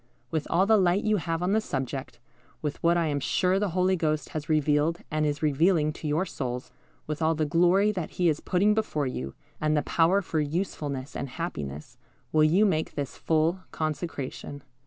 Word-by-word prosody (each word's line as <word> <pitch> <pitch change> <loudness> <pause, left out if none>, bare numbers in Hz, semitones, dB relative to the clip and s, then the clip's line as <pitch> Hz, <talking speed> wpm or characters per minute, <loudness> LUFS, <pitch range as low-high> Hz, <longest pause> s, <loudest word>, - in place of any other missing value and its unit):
With 160 -2 -1
all 185 +3 +3
the 220 +1 +5
light 185 0 +3
you 215 -1 +2
have 165 -1 -2
on 180 - +1
the 220 +2 +3
subject, 135 - -4 0.5
with 150 -1 -3
what 170 +1 +3
I 170 - +2
am 145 -2 0
sure 185 +6 +1
the 205 -1 0
Holy 185 +1 +3
Ghost 155 -4 -1
has 155 0 -5
revealed 155 +1 +2
and 155 0 +1
is 145 +1 -2
revealing 155 +1 +3
to 155 - -6
your 155 +5 +1
souls, 125 -7 -5 0.3
with 150 +1 -4
all 160 +1 +2
the 155 0 0
glory 180 +7 +4
that 180 -6 -4
He 180 - +3
is 155 -2 +2
putting 200 +3 +2
before 210 -9 -1
you, 70 - -4 0.3
and 155 0 +2
the 150 - +1
power 175 +7 +3
for 160 - -1
usefulness 145 -4 -3
and 135 - -4
happiness, 75 - -6 0.3
will 155 -1 +4
you 175 +8 +4
make 160 -6 0
this 140 -2 -4
full 165 +3 +1
consecration? 150 -3 -4
155 Hz, 195 wpm, -27 LUFS, 145-180 Hz, 0.5 s, the